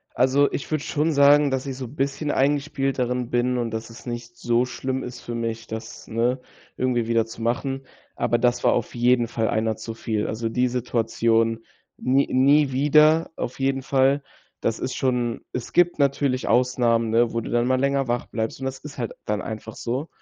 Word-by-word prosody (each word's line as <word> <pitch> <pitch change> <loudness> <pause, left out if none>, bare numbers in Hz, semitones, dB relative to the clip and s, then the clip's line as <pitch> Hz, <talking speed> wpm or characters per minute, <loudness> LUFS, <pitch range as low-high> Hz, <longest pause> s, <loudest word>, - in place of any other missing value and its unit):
Also, 135 +3 +3
ich - - -4
würde 155 -1 -1
schon 155 +2 0
sagen, 145 0 +5
dass 130 -1 -1
ich 135 -2 -5
so 130 -2 -6
bisschen 140 +2 -2
eingespielt 140 -1 0
darin 125 -1 -1
bin 125 +1 +1
und 120 -2 -1
dass 110 +1 -5
es 115 - -13
nicht 120 -1 -6
so 120 +1 +1
schlimm 130 +1 -3
ist 125 0 -8
für 120 - -6
mich, 115 -1 -3
das, 110 0 -7
ne, 120 +3 0 0.4
irgendwie 125 -3 0
wieder 115 -1 +2
zu 115 0 -11
machen, 135 +3 -2 0.3
aber 120 - +1
das 120 0 +1
war - - +4
auf 120 - -2
jeden 120 0 +3
Fall 115 -1 -1
einer 110 0 0
zu 110 +1 -7
viel. 110 -2 -2
Also, 115 +1 -3
die 125 +2 +1
Situation 115 -2 0 0.3
n 135 +2 +2
nie 140 +2 +4
wieder, 150 +4 +4
auf 120 - -4
jeden 135 0 0
Fall. 135 +1 +2 0.4
Das 115 - -1
ist 130 - -3
schon 125 -3 0
Es 125 -2 -5
gibt 175 -2 +3
natürlich 140 -2 +1
Ausnahmen, 120 -2 +2
ne, 115 +1 +3
wo 115 - -1
du - - -7
dann 120 0 +2
mal 130 0 +2
länger 140 0 +1
wach 120 0 -1
bleibst 110 +3 -4
und 135 - -3
das 135 0 -4
ist 145 -2 -10
halt 120 - -3
dann 105 -1 -1
einfach 110 +2 -7
so, 130 +7 -3
125 Hz, 200 wpm, -24 LUFS, 115-135 Hz, 0.4 s, sagen